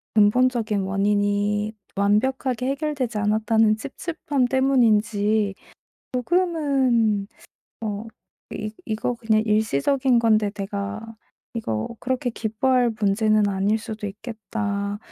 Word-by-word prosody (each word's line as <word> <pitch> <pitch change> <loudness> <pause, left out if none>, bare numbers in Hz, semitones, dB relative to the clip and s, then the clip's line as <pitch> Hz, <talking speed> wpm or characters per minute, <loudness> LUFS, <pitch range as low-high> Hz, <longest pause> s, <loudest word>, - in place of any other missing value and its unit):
근본적인 220 0 +3
원인이 205 +2 0 0.2
완벽하게 250 +5 +1
해결되지 275 -5 -2
않았다는 215 +1 +2
찝찝함 280 +1 -2
때문인지 220 -6 +2 0.6
조금은 260 - +1 0.5
어 215 0 -4 0.5
이 215 0 -4
'이거 220 +3 -1
그냥 220 -2 +1
일시적인 220 - +2
건데 215 -2 +3
내가 205 +2 -5 0.4
이거 110 - -2
그렇게 255 -1 -1
기뻐할 240 +3 +1
문제는 215 +1 +3
아닐 200 +2 +1
수도 215 -1 -6
있겠다. 205 -1 -4
220 Hz, 240 characters per minute, -23 LUFS, 205-250 Hz, 0.6 s, 근본적인